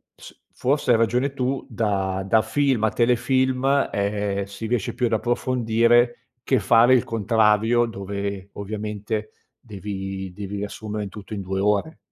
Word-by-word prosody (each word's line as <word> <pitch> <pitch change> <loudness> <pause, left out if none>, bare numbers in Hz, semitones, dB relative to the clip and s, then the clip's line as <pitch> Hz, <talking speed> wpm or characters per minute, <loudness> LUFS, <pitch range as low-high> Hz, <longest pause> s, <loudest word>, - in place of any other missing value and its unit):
s - - -14
forse 135 0 +1
hai 115 - +5
ragione 125 +5 +1
tu, 135 0 -2
da 95 -5 -1
da 110 +2 +4
film 130 0 +1
a 110 - +4
telefilm, 130 +3 +2
ehm, 100 0 -1
si 100 +3 -7
riesce 120 -3 -1
più 125 - 0
ad 115 - -2
approfondire 120 0 +2 0.2
che 130 +1 +2
fare 115 +5 +5
il 125 - +4
contrario 110 +1 +2
dove, 100 -1 -5
ovviamente, 105 +1 -4 0.3
devi 95 -3 -6
devi 100 +2 -6
riassumere 105 +1 -5
in - - -7
tutto 105 +2 -10
in 100 - -4
2 95 0 -3
ore. 105 +10 0
110 Hz, 150 wpm, -23 LUFS, 100-120 Hz, 0.3 s, hai